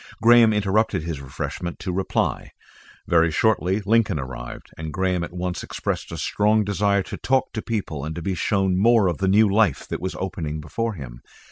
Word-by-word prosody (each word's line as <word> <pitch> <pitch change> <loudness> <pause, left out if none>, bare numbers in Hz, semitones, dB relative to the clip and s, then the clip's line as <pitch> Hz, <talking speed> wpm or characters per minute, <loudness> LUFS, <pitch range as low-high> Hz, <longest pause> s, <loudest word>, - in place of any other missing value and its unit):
Graham 120 -1 +6
interrupted 105 -3 +1
his 80 -4 -4
refreshment 70 +5 -5
to 90 - -4
reply. 95 +1 -1 0.6
Very 85 -1 +4
shortly 95 +2 +1
Lincoln 110 -3 +2
arrived, 65 -3 -7
and 80 0 -6
Graham 90 +1 0
at 85 - -6
once 90 0 -3
expressed - - -4
a - - -5
strong 105 +1 +2
desire 100 -1 +1
to - - -7
talk 130 0 0
to 110 - -3
people 100 - -3
and 80 +1 -4
to 85 - -5
be 95 - -1
shown 95 +1 +1
more 115 -1 +5
of 85 -4 -1
the 95 - +1
new 105 +3 +5
life 100 -8 +2
that - - -4
was 95 +1 -3
opening 80 -5 -4
before 110 +9 -3
him. - - -9
95 Hz, 190 wpm, -23 LUFS, 80-105 Hz, 0.6 s, Graham